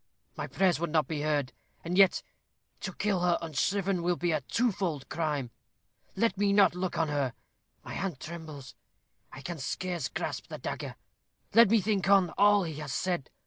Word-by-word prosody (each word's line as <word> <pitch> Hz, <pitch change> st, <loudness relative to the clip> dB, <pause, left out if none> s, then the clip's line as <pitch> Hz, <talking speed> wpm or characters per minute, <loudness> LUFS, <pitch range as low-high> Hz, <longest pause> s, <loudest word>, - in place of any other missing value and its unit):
My -, -, -4 dB
prayers 185 Hz, -4 st, +2 dB
would 170 Hz, 0 st, -1 dB
not 155 Hz, -1 st, +2 dB
be 155 Hz, -2 st, -3 dB
heard. 145 Hz, -3 st, 0 dB, 0.3 s
And 170 Hz, +2 st, -2 dB
yet, 195 Hz, -1 st, +5 dB, 0.6 s
to -, -, -5 dB
kill 205 Hz, -3 st, 0 dB
her 175 Hz, -1 st, +2 dB
unshriven 180 Hz, +4 st, 0 dB
will 175 Hz, +1 st, +1 dB
be 175 Hz, 0 st, 0 dB
a 155 Hz, -2 st, 0 dB
twofold 185 Hz, -, -1 dB
crime. 150 Hz, -7 st, -2 dB, 0.6 s
Let 225 Hz, 0 st, +1 dB
me 200 Hz, -1 st, +3 dB
not 200 Hz, -4 st, +5 dB
look 180 Hz, 0 st, -3 dB
on 165 Hz, -2 st, +1 dB
her. 140 Hz, -4 st, -1 dB, 0.5 s
My -, -, -7 dB
hand 185 Hz, -9 st, -3 dB
trembles. 155 Hz, -4 st, -8 dB, 0.6 s
I -, -, -10 dB
can 170 Hz, +2 st, -5 dB
scarce 175 Hz, +2 st, -3 dB
grasp -, -, -4 dB
the -, -, -7 dB
dagger. -, -, -5 dB, 0.6 s
Let 230 Hz, -1 st, +7 dB
me 225 Hz, 0 st, +4 dB
think 195 Hz, -1 st, 0 dB
on 195 Hz, -4 st, +5 dB
all 205 Hz, -1 st, +4 dB
he 160 Hz, -4 st, -5 dB
has 150 Hz, -3 st, -5 dB
said. 170 Hz, +3 st, -1 dB
175 Hz, 180 wpm, -29 LUFS, 150-195 Hz, 0.6 s, Let